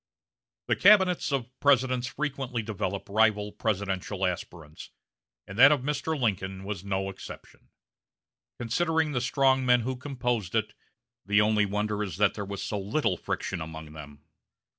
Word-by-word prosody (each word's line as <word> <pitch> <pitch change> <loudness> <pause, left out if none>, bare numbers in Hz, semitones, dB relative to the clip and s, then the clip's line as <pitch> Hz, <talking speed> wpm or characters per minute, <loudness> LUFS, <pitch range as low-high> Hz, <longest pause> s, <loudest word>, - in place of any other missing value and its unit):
The - - +1
cabinets 190 -6 +5
of 125 -3 -2
Presidents 130 -3 +2
frequently 135 -4 -3
develop 100 -2 -4
rival 105 0 +2
presidential 100 -2 -2
aspirants, 85 -4 -6 0.6
and 100 +4 -8
that 140 +3 +9
of 145 -4 +2
Mr. 150 +3 -2
Lincoln 95 -5 -2
was 100 -2 -5
no 95 -1 -2
exception. 95 - -11 0.9
Considering 160 +6 0
the 125 -4 -1
strong 130 +1 +2
men 125 -1 +4
who 130 +3 -3
composed 125 -7 -3
it, 110 -1 0 0.5
the 105 +1 +3
only 105 -1 +3
wonder 105 +1 -2
is 100 -3 -4
that 105 -1 +3
there 100 - -5
was 100 0 -5
so 105 - -3
little 100 +1 0
friction 90 +1 -4
among 80 -1 -8
them. 75 -1 -11
110 Hz, 145 wpm, -27 LUFS, 95-130 Hz, 0.9 s, that